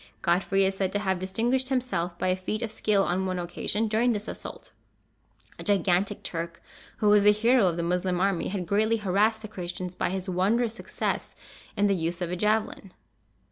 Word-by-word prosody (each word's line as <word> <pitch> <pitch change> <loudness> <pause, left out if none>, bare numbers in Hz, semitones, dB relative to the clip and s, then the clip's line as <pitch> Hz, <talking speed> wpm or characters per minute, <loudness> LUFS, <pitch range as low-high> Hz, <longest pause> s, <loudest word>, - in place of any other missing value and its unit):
Godfrey 195 +3 +2
is 195 0 0
said 190 -1 0
to - - +2
have 190 -3 -1
distinguished 235 +8 0
himself 240 -10 -1
by 185 - 0
a 185 - +3
feat 215 +5 -3
of 225 - -2
skill 205 -2 +2
on 190 +1 0
one 185 -1 -2
occasion 180 +5 -1
during 230 +3 +2
this 210 +1 -4
assault. - - -8 0.9
A - - -6
gigantic 195 0 +1
Turk, 170 0 -5 0.4
who 210 - +2
was 205 -1 +6
the 210 - +7
hero 230 0 +4
of 170 -1 0
the 170 - -1
Moslem 180 +1 0
army, 195 -2 +1
had 190 -2 -3
greatly 215 +5 +2
harassed 210 +2 +1
the - - -5
Christians 180 -3 -5
by - - -1
his 190 +1 -4
wondrous 215 +6 +1
success - - -4 0.4
in 205 - +3
the 200 - +3
use 170 -1 -2
of 175 -2 -2
the 180 - -2
javelin. 210 -1 -1
195 Hz, 195 wpm, -27 LUFS, 180-215 Hz, 0.9 s, the